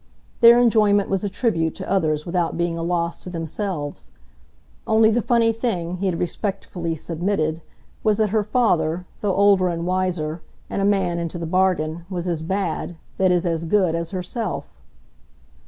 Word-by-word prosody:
Their 235 Hz, 0 st, +8 dB
enjoyment 210 Hz, -4 st, +3 dB
was 195 Hz, 0 st, 0 dB
a 205 Hz, -, -1 dB
tribute 175 Hz, -7 st, 0 dB
to 190 Hz, -, -7 dB
others 155 Hz, -6 st, 0 dB
without 175 Hz, -1 st, -1 dB
being 170 Hz, -1 st, 0 dB
a 165 Hz, -, -4 dB
loss 170 Hz, 0 st, -1 dB
to -, -, -7 dB
themselves. 165 Hz, -2 st, -4 dB, 0.8 s
Only 220 Hz, 0 st, +5 dB
the 240 Hz, +2 st, +2 dB
funny 230 Hz, -1 st, +2 dB
thing, 180 Hz, -7 st, -2 dB
he 195 Hz, +2 st, -1 dB
had 175 Hz, -3 st, -1 dB
respectfully 175 Hz, -2 st, -3 dB
submitted, 165 Hz, 0 st, -2 dB, 0.4 s
was 215 Hz, -2 st, +3 dB
that 215 Hz, -1 st, +2 dB
her 215 Hz, -1 st, +2 dB
father, 180 Hz, -7 st, +1 dB
though 200 Hz, -3 st, 0 dB
older 200 Hz, -2 st, +4 dB
and 170 Hz, 0 st, -3 dB
wiser, 175 Hz, -3 st, -1 dB, 0.3 s
and -, -, -1 dB
a -, -, +2 dB
man 190 Hz, -4 st, +1 dB
into 170 Hz, 0 st, -3 dB
the 170 Hz, -, -4 dB
bargain, 170 Hz, -2 st, 0 dB
was 180 Hz, -2 st, -3 dB
as 170 Hz, -3 st, -1 dB
bad 175 Hz, -1 st, -2 dB, 0.2 s
that 190 Hz, -1 st, +4 dB
is 180 Hz, 0 st, +2 dB
as 165 Hz, -1 st, -1 dB
good 180 Hz, 0 st, +2 dB
as 170 Hz, 0 st, -2 dB
herself. 190 Hz, +2 st, -4 dB
180 Hz, 170 wpm, -22 LUFS, 170-205 Hz, 0.8 s, Their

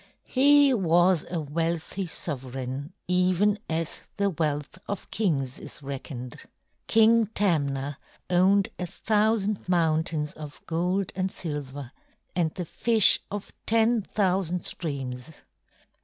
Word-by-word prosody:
He 285 Hz, +1 st, +5 dB
was 175 Hz, -4 st, +3 dB
a 175 Hz, -, -2 dB
wealthy 165 Hz, +5 st, -2 dB
sovereign 135 Hz, -2 st, -4 dB, 0.2 s
even 185 Hz, +3 st, +2 dB
as 165 Hz, 0 st, -2 dB, 0.2 s
the 200 Hz, -1 st, +1 dB
wealth 150 Hz, 0 st, -2 dB
of 205 Hz, -, -5 dB
kings 145 Hz, -, -1 dB
is -, -, -10 dB
reckoned. 130 Hz, -2 st, -6 dB, 0.5 s
King 225 Hz, 0 st, +5 dB
Tamna 145 Hz, -7 st, 0 dB, 0.3 s
owned 185 Hz, +2 st, +3 dB
a 180 Hz, -, -2 dB
thousand 215 Hz, 0 st, 0 dB
mountains 160 Hz, -3 st, +1 dB
of 150 Hz, -2 st, -9 dB
gold 180 Hz, +4 st, -1 dB
and 190 Hz, 0 st, 0 dB
silver 145 Hz, -6 st, -5 dB, 0.4 s
and 170 Hz, -3 st, +1 dB
the 180 Hz, -, -4 dB
fish 225 Hz, +4 st, +4 dB
of 205 Hz, -1 st, -6 dB
ten 230 Hz, +1 st, +3 dB
thousand 185 Hz, -3 st, 0 dB
streams. 135 Hz, -2 st, -5 dB
175 Hz, 110 wpm, -26 LUFS, 145-200 Hz, 0.5 s, He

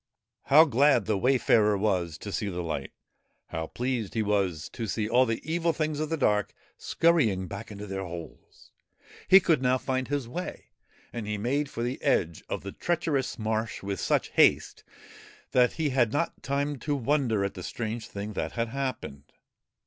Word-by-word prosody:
How 155 Hz, +4 st, +7 dB
glad 140 Hz, +1 st, +3 dB
the 110 Hz, -, +1 dB
wayfarer 110 Hz, -2 st, +3 dB
was 90 Hz, -6 st, 0 dB
to 100 Hz, -, -7 dB
see 100 Hz, +1 st, -2 dB
the 90 Hz, -2 st, -4 dB
light 75 Hz, -5 st, -4 dB, 0.6 s
I -, -, -4 dB
How 80 Hz, 0 st, -3 dB
pleased 120 Hz, -3 st, -3 dB
he 110 Hz, -, +1 dB
was 95 Hz, -6 st, 0 dB
to 115 Hz, -, -5 dB
see 105 Hz, +1 st, -1 dB
all 125 Hz, +3 st, +4 dB
the 115 Hz, 0 st, -2 dB
Evil 165 Hz, +1 st, 0 dB
Things 155 Hz, -2 st, -2 dB
of 155 Hz, 0 st, -2 dB
the 165 Hz, -, -1 dB
dark 105 Hz, -, +1 dB, 0.2 s
scurrying 125 Hz, -, +2 dB
back 100 Hz, +4 st, -7 dB
into 105 Hz, 0 st, -7 dB
their 95 Hz, -1 st, -4 dB
holes 85 Hz, -4 st, -10 dB, 0.3 s
I -, -, -33 dB, 0.2 s
He 190 Hz, -, +9 dB
could 165 Hz, -7 st, +2 dB
now 130 Hz, 0 st, +3 dB
find 130 Hz, 0 st, -2 dB
his 140 Hz, -4 st, -2 dB
way, 180 Hz, +9 st, -6 dB, 0.4 s
and 115 Hz, -3 st, -5 dB
he 105 Hz, 0 st, -2 dB
made 135 Hz, +7 st, -1 dB
for 115 Hz, -, -4 dB
the 125 Hz, +2 st, -3 dB
edge 85 Hz, -1 st, +1 dB
of -, -, -3 dB
the 100 Hz, -, -6 dB
treacherous 160 Hz, -, -1 dB
marsh 110 Hz, -1 st, -2 dB
with 100 Hz, -1 st, -3 dB
such -, -, +1 dB
haste -, -, +3 dB, 0.7 s
that 125 Hz, -1 st, +4 dB
he 155 Hz, -3 st, -1 dB
had 120 Hz, -4 st, +2 dB
not 165 Hz, +5 st, -2 dB
time 140 Hz, 0 st, -2 dB
to 145 Hz, +2 st, -1 dB
wonder 125 Hz, -6 st, +1 dB
at 100 Hz, -, -3 dB
the 90 Hz, -, -8 dB
strange 110 Hz, +4 st, -4 dB
thing 105 Hz, +1 st, -6 dB
that -, -, -3 dB
had 115 Hz, -1 st, -1 dB
happened. 120 Hz, -, -5 dB
115 Hz, 185 wpm, -28 LUFS, 100-140 Hz, 0.7 s, He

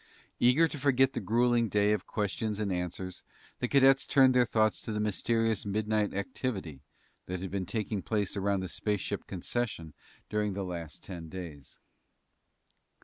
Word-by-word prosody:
Eager 125 Hz, +7 st, +5 dB
to 150 Hz, -, -7 dB
forget 135 Hz, -1 st, +3 dB
the -, -, -2 dB
grueling 115 Hz, +3 st, +2 dB
day 105 Hz, 0 st, +3 dB
of 105 Hz, -4 st, -1 dB
questions 105 Hz, 0 st, -2 dB
and 100 Hz, -3 st, 0 dB
answers, 90 Hz, +1 st, -4 dB, 0.4 s
the 125 Hz, -, 0 dB
cadets 135 Hz, 0 st, +5 dB
turned 135 Hz, -2 st, +6 dB
their 125 Hz, -1 st, +4 dB
thoughts 110 Hz, 0 st, +2 dB
to -, -, -5 dB
the 105 Hz, -, -2 dB
mysterious 110 Hz, +1 st, +1 dB
midnight 105 Hz, +1 st, 0 dB
activity 100 Hz, -, -4 dB, 0.5 s
that 90 Hz, 0 st, -3 dB
had 95 Hz, 0 st, -5 dB
been 95 Hz, -2 st, -2 dB
taking 105 Hz, 0 st, -2 dB
place 105 Hz, 0 st, -1 dB
around 100 Hz, -1 st, 0 dB
the 95 Hz, -, -3 dB
spaceship 105 Hz, +2 st, -2 dB
concession 95 Hz, -4 st, -3 dB, 0.3 s
during 105 Hz, -1 st, -1 dB
the 100 Hz, +1 st, -3 dB
last 85 Hz, -4 st, -6 dB
ten 85 Hz, -4 st, -7 dB
days. 80 Hz, -7 st, -8 dB
105 Hz, 155 wpm, -30 LUFS, 95-115 Hz, 0.5 s, turned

